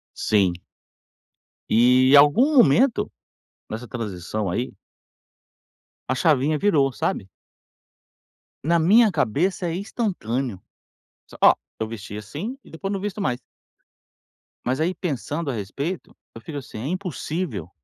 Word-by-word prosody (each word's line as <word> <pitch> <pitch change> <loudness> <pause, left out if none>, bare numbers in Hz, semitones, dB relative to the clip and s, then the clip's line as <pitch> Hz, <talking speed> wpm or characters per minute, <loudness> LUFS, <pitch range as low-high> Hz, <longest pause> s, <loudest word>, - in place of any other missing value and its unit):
Sim. 100 -5 +2 1.2
E 125 +4 +5
algum 240 - +5
momento, 240 - +4 0.6
nessa 115 +3 -6
transição 105 -2 -4
aí 120 +8 -2 1.4
a 130 - +1
chavinha 150 0 +2
virou, 145 -7 +3
sabe? 95 -4 -2 1.4
Na 170 +1 +3
minha 210 +6 +5
cabeça 170 - 0
é 165 - -2
instantâneo, 140 - -2 0.7
s - - -14
ó, - - +8 0.3
eu 110 - -1
vestia 105 -2 -7
assim 160 - -6
e - - -18
depois 195 +5 -5
não 195 - -2
visto 205 0 -4
mais. 125 -7 -1 1.3
Mas, 130 +4 0
aí 175 +4 0
pensando 150 - -3
a - - -4
respeito, 140 - -5 0.2
eu - - -9
fico 145 +6 -7
assim, 135 -5 -8
é 130 - -4
impossível 175 - -4
145 Hz, 120 wpm, -23 LUFS, 115-185 Hz, 1.4 s, ó